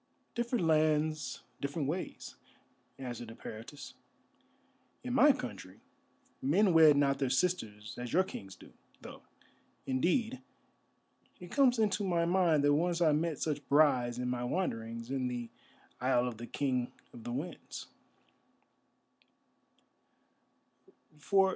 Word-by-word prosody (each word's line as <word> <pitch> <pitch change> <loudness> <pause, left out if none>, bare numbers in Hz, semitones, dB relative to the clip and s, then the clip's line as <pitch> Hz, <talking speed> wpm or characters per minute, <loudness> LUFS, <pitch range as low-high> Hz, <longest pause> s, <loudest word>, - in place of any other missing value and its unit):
"Different 235 -5 -1
lands, 155 -3 +1 0.2
different 140 +1 -2
ways," 175 +5 -4 0.6
answered 120 -3 -6
Eperitus. 115 +4 -9 1.1
"In 250 -1 -3
my 285 +3 +7
country 100 - -7 0.6
men 180 +8 +3
wed 155 -3 +7
not 140 -1 +2
their 135 - +1
sisters 115 - -1
as 125 -1 -5
your 185 +3 +4
kings 95 - -9
do, - - -16 0.3
though, - - -10 0.6
indeed, 220 - 0 1.0
it 180 -1 -11
comes 265 -3 +4
into 210 -2 +1
my 170 -3 +1
mind 170 -4 +3
that 145 0 +4
once 170 +3 +1
I 165 -3 +4
met 155 0 0
such 150 -1 -3
brides 130 -5 +4
in 125 0 -2
my 125 0 -2
wanderings 115 -6 -3
in 130 -2 -1
the 120 -1 -5 0.5
isle 125 -1 +2
of 120 -3 -5
the 120 +1 -7
King 130 -3 -1 0.2
of 115 - -11
the 120 - -5
Winds." 145 +9 -6
145 Hz, 120 wpm, -32 LUFS, 125-175 Hz, 1.1 s, my